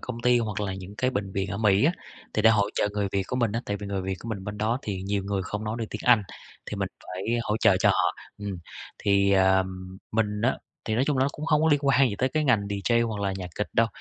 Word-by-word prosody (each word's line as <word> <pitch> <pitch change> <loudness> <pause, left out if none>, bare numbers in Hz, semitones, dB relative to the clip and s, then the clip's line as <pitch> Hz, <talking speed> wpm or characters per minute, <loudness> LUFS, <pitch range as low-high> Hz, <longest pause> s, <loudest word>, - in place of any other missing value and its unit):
công 120 -2 -5
ty 125 0 +4
hoặc 105 -3 -2
là 95 -2 -2
những 95 +1 -9
cái 130 0 +2
bệnh 100 -4 -3
viện 95 -1 -2
ở 100 - -3
Mỹ 105 +2 +4
á, 165 - +4 0.4
thì 110 - +1
để 110 - +7
hỗ 105 -2 +2
trợ 105 - +1
người 100 -1 -1
Việt 100 - +1
của 125 - -3
mình 115 -4 +1
á. 115 - -1
Tại 100 - -1
vì 100 0 -7
người 100 -1 -2
Việt 95 0 -2
của 115 - -9
mình 100 -4 -4
bên 105 +1 -6
đó 115 +4 +1
thì 95 -3 -4
nhiều 100 0 -1
người 100 -1 -1
không 105 +3 -4
nói 110 +2 -2
được 115 - -2
tiếng 105 - -5
Anh, 120 -4 +6 0.4
thì - - -5
mình - - -1 0.2
phải 90 +1 -6 0.2
hỗ 105 -2 -1
trợ - - +5
cho - - +5
họ, - - +2 0.2
ừm. 100 -3 -5 0.4
Thì, 100 -1 +3
ờm, 95 -1 +1
mình 105 -1 0
á, 130 - +2 0.3
thì 110 - -1
nói 125 +4 +2
chung 145 -3 +1
là - - +4
nó - - +2
cũng 150 - -6
hông 150 0 +3
có 160 - +4
liên 145 -2 +4
quan 135 -1 +5
gì 100 - -3
tới 130 - +2
cái 155 +3 0
ngành 125 -7 +4
DJ 105 +4 +1
hoặc 105 -2 -4
là 100 -1 0
nhạc 90 -2 -5
kịch 105 - -2
đâu, 115 0 +4
105 Hz, 290 wpm, -26 LUFS, 100-115 Hz, 0.4 s, để